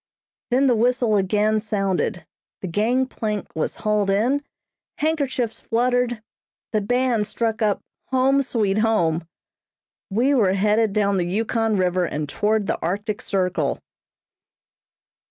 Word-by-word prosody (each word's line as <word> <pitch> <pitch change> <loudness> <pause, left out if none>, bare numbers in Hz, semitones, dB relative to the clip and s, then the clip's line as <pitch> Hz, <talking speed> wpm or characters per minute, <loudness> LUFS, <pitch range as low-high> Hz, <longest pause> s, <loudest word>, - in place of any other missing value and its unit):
Then 260 +3 +3
the 255 - +4
whistle 240 -1 +2
again 210 +2 +2
sounded 195 -3 -1 0.4
the 190 - -4
gangplank 215 +1 -1
was 160 - -1
hauled 210 -2 0
in, 240 +9 +1 0.5
handkerchiefs 280 -7 -1
fluttered, 240 -1 0 0.5
the 215 - +1
band 245 0 +1
struck 225 0 -2
up 210 -2 +1 0.3
"Home 265 +1 +3
Sweet 215 -6 0
Home" 175 -7 +1 0.8
we 240 +8 +2
were 205 -8 +3
headed 210 +2 +2
down 200 -1 +1
the 175 -1 0
Yukon 220 +2 0
River 180 -1 +1
and 150 -2 -3
toward 210 +5 0
the - - -2
Arctic 205 +5 -2
Circle. 180 -7 -1
215 Hz, 120 wpm, -22 LUFS, 195-245 Hz, 0.8 s, the